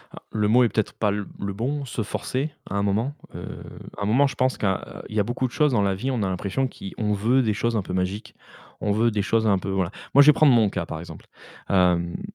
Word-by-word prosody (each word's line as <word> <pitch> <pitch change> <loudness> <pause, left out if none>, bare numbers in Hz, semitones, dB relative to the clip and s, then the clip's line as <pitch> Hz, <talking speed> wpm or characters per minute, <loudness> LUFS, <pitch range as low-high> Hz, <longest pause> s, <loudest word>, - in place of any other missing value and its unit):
Ah, - - -9
le 105 -1 +1
mot 125 +4 +5
est 120 - +3
peut-être 110 -1 -1
pas 105 -2 0
le 105 0 -3 0.3
bon, 135 +7 -2
se 115 - -4
forcer, 130 +7 -2 0.2
à 95 - -4
un 100 - +1
moment. 110 +8 0 0.2
Heu, - - -6 0.5
à 100 - -3
un - - 0
moment, 125 +7 +4
je 140 - -1
pense 130 0 +1
que, - - -2
heu, 95 -1 +2 0.3
il 110 - -9
y - - +2
a - - +4
beaucoup 120 +4 -2
de - - -12
choses 150 0 +2
dans 105 -5 +2
la 100 -1 +2
vie, 110 +8 -3
on 125 -5 0
a 95 - 0
l'impression 100 +8 -1
qui 95 - -9
on 105 -1 0
veut 120 +6 +2
des 110 -3 +1
choses 115 +3 -1
un 100 - -1
peu 90 - -6
magiques. 95 +3 -3 0.5
On 105 - 0
veut 115 +3 +2
des 105 -1 0
choses 110 +2 +1
un 100 -3 +3
peu 95 - -5
voilà. 95 -3 0 0.2
Moi, 140 - +9
je 145 - +2
vais 150 - +9
prendre 145 -3 +5
mon 110 -3 +4
cas 90 -3 -3
par 80 - -6
exemple, 85 - -11 0.4
hem 90 -2 +2
105 Hz, 275 wpm, -24 LUFS, 100-125 Hz, 0.5 s, Moi